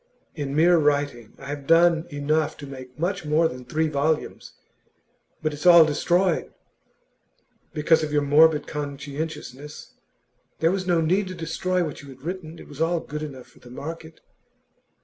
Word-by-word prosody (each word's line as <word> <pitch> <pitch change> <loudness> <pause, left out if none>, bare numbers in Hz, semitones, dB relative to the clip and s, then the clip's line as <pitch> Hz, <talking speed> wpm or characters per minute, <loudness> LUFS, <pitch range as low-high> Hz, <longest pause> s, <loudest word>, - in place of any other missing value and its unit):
In 140 -2 -4
mere 170 +2 +5
writing, 145 -6 0
I 135 - -12
have 145 -1 -6
done 165 0 +4
enough 150 +1 -1
to 145 - -9
make 130 -2 -10
much 180 +4 -2
more 155 +2 +2
than 125 -3 -8
three 160 +4 0
volumes; 155 +1 -2 0.9
but 155 -1 0
it's 150 +5 -2
all 170 -2 +9
destroyed.' 175 +4 +1 1.2
'Because 160 +2 +3
of 155 -1 -3
your 145 -1 +2
morbid 150 +1 +5
conscientiousness. 145 0 -6 0.6
There 165 +1 +2
was 185 -1 -2
no 175 -2 +3
need 185 +5 +1
to 185 - -6
destroy 180 +2 -1
what 150 -4 -6
you 140 - -13
had 130 0 -14
written. 170 -1 -6
It - - -12
was 145 +1 -9
all 170 +1 +2
good 150 -1 -7
enough 135 -5 -7
for - - -22
the 125 - -15
market. 160 +5 -8
155 Hz, 165 wpm, -24 LUFS, 145-165 Hz, 1.2 s, all